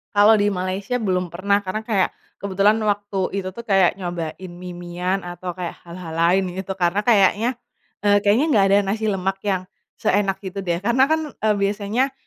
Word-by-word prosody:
Kalau 210 +2 +6
di 205 - +2
Malaysia 190 +6 -2
belum 180 -4 -1
pernah 200 +3 +2
karena 200 +4 -3
kayak, 215 -4 +1 0.3
kebetulan 200 +2 +2
waktu 200 -2 -1
itu 185 - -5
tuh 235 +5 -9
kayak 195 -3 +3
nyobain 175 0 -5
mie-miean 180 +1 -4
atau 175 0 -6
kayak 175 -2 -4
hal-hal 170 -1 -9
lain 175 +2 +2
gitu 190 0 -5
karena 180 +2 +1
kayaknya, 210 +1 +3 0.6
eee, 205 0 +5
kayaknya 210 +8 +3
gak 200 -3 +5
ada 200 - +5 0.2
nasi 220 0 -3
lemak 195 0 -2
yang, 190 -3 -1 0.3
seenak 195 -1 +1
itu 190 +1 -5
deh 175 -2 -1
karena 235 +4 +3
kan, 315 - +3
eee, 215 -1 +1
biasanya, 205 +6 0
195 Hz, 170 wpm, -22 LUFS, 180-205 Hz, 0.6 s, Kalau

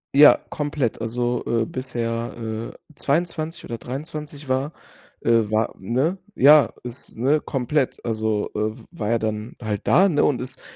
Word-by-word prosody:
Ja, 150 +1 +9
komplett, 145 -7 -2
also, 120 +1 -1
äh, 115 -1 +1
bis 130 +2 -6
er, 115 0 -2
äh, 110 0 -5 0.2
22 160 +2 -1
oder 115 - -5
23 145 +3 -7
war 130 +3 0 0.5
äh, 115 -2 +3
war, 110 +1 +1
ne, 130 - 0 0.2
ja, 145 -1 +7
ist, 120 -1 -7
ne, 140 +6 +2
komplett, 135 +1 -1
also, 110 -2 0
äh, 110 +1 -1
war 155 -12 -3
er 115 0 +2
dann 110 +1 -3
halt 105 -3 -2
da, 190 +2 +6
ne, 150 -6 +2
und 140 - +2
ist 125 +1 -7
125 Hz, 155 wpm, -23 LUFS, 115-145 Hz, 0.5 s, Ja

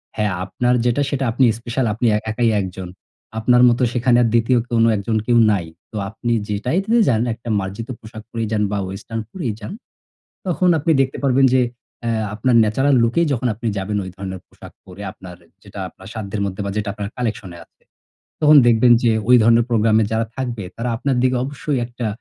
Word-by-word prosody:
"হ্যাঁ 105 -2 0
আপনার 120 +6 0
যেটা, 120 +3 +1
সেটা 140 -1 -2
আপনি 130 +3 +3
স্পেশাল, 120 +2 -2
আপনি 115 +3 -3
এ - - +3
একাই 115 +1 +1
একজন, 95 -1 -6 0.5
আপনার 125 +2 +4
মতো 120 +2 0
সেখানে 120 0 +2
আর - - +2
দ্বিতীয় 120 +2 +3
কোনো 115 -1 +3
একজন 105 +3 -1
কেউ 120 -1 +4
নাই।" 95 -5 0 0.3
তো 110 - -6
আপনি 120 +3 -4 0.2
যেটাইতে 140 - -1
যান, 115 -3 +2
একটা 115 +1 -9
মার্জিত 100 +5 -6
পোশাক 110 0 -11
পরেই 115 -1 -3
যান 105 -1 +1
বা, 105 - -1
western 110 +4 -6
পরেই 130 - -4
যান, 105 - -7 0.7
তখন 180 +1 +2
আপনি 155 +3 +1
দেখতে 135 0 -2
পারবেন 135 0 +4
যে 130 - +4 0.4
অ্যা 115 -2 -1
আপনার 120 +4 +1
natural 135 +6 +2
look 115 +1 0
এই 170 - +2
যখন 125 0 -1
আপনি 115 +3 -5
যাবেন 100 +2 -2
ওই 95 - -7
ধরনের 95 -1 -6
পোশাক - - -14
পরে 95 +2 -12
আপনার 90 -2 -12 0.3
যেটা 100 -1 -10
আপনার 95 - -15
সাধ্যের 105 -2 -4
মধ্যে 95 +1 -4
বা, - - -2
যেটা 105 -1 -2
আপনার 100 -1 -5
collection 110 -6 -3
এ - - -11
আছে। - - -41 0.6
তখন 150 0 +7
দেখবেন 120 +1 +5
যে 115 - +4 0.2
ওই 125 - +8
ধরনের 115 +1 +4
প্রোগ্রামে 110 -1 +3
যারা 110 0 0
থাকবে, 120 -5 -4
তারা 120 +2 -3
আপনার 135 +2 -1
দিকে 130 0 +2
অবশ্যই 140 0 -3
একটা 120 -1 -5
115 Hz, 195 wpm, -20 LUFS, 105-125 Hz, 0.7 s, ওই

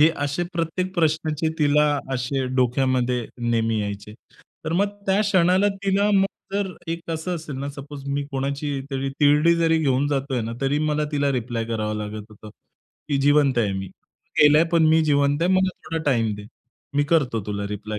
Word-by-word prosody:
हे 155 - +7 0.2
असे 145 +4 -1
प्रत्येक 175 +2 -2
प्रश्नाचे 160 -1 0
तिला 150 0 +4 0.3
असे 130 +2 -1
डोक्यामध्ये 125 -1 +1
नेहमी 115 -2 0
यायचे. 100 +1 -5 0.5
तर 160 - -2
मग 200 +4 +2 0.2
त्या 195 +1 +3
क्षणाला 190 -1 +3 0.2
तिला 200 +1 +2
मग 195 0 +4 0.3
जर 200 -1 -1 0.2
एक 165 0 -4
असं 165 +3 -3
असेल 155 -4 -7
ना, 140 +1 -4
सपोज 140 0 -9
मी 140 +1 -1
कोणाची 140 +1 -2
तरी 135 0 -2
तिरडी 150 +3 +5
जरी 165 -1 +2
घेऊन 140 -2 +1
जातोय 135 -3 -1
ना, 115 +1 -4
तरी 140 +2 +1
मला 150 0 0
तिला 145 -1 +1
रिप्लाय 120 -2 -2
करावा 110 -2 -2
लागत 105 0 -5
होता, 105 0 -13 0.6
की 145 - +1
जिवंत 145 -2 +4
आहे 105 -4 +1
मी, 95 0 -4
तो - - -4
गेलाय 150 +2 +6
पण 165 -2 +4
मी 160 +1 +5
जिवंत 145 0 +2
आहे 175 - +2
मला 185 0 +3 0.2
थोडा 165 0 -3
टाईम 115 -4 +1
दे. 105 0 -10 0.5
मी 145 0 +2
करतो 145 -8 +1
तुला 100 -1 -3
रिप्लाय. 105 +1 -5
145 Hz, 180 wpm, -23 LUFS, 120-160 Hz, 0.6 s, हे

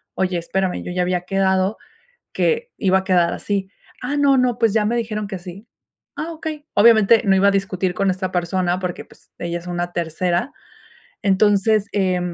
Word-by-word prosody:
"Oye, 185 -2 0
espérame, 185 +2 -2
yo - - -6
ya 180 - 0
había 180 0 0
quedado 190 +1 +1 0.6
que 470 +1 0
iba 190 -1 +2
a 190 - -5
quedar 175 -3 +2
así". 195 -2 -3 0.3
"Ah, 265 +4 -2
no, 280 -1 +4
no, 250 -2 +1
pues 225 -2 +2
ya 215 -1 +2
me 230 +3 0
dijeron 215 -3 -2
que 195 -1 -5
así", 180 +4 -10 0.5
"Ah, 330 +2 -4
okey". 310 -2 -6
Obviamente, 220 +1 +6
no 195 -1 +4
iba 200 +1 +4
a - - +2
discutir 190 -2 -1
con 195 -1 +1
esta 185 0 -3
persona 180 0 0
porque, 180 -2 -4
pues, - - -23
ella 170 0 -3
es 175 - -13
una 175 0 -3
tercera, 175 - -1 0.7
entonces, 205 +1 +3
eh, 185 -3 +1
190 Hz, 185 wpm, -20 LUFS, 180-220 Hz, 0.7 s, Obviamente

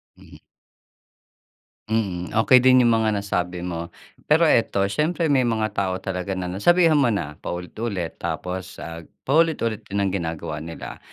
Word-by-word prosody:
Mhm. - - -16 1.5
Hmm, 95 -6 -1
okey 115 +3 +6
din 130 0 +5
yung 120 - +4
mga 110 -1 +1
nasabi 90 -3 -2
mo. 85 -2 -4 0.4
Pero 155 +3 +4
ito, 115 -10 +3
siyempre 160 - 0
may 130 -3 +3
mga 110 -2 0
tao 95 -2 -1
talaga 95 0 -3
na 90 -1 -4
nasabihan 165 - +4
mo 135 - +4
na 85 -10 -2
paulit-ulit 90 0 -4
tapos, 90 0 -4
ah, 85 0 -7 0.2
paulit-ulit 140 -7 +1
din 100 0 -1
ang 95 - 0
ginagawa 80 -4 -4
nila. 80 +1 -8
100 Hz, 145 wpm, -23 LUFS, 90-125 Hz, 1.5 s, okey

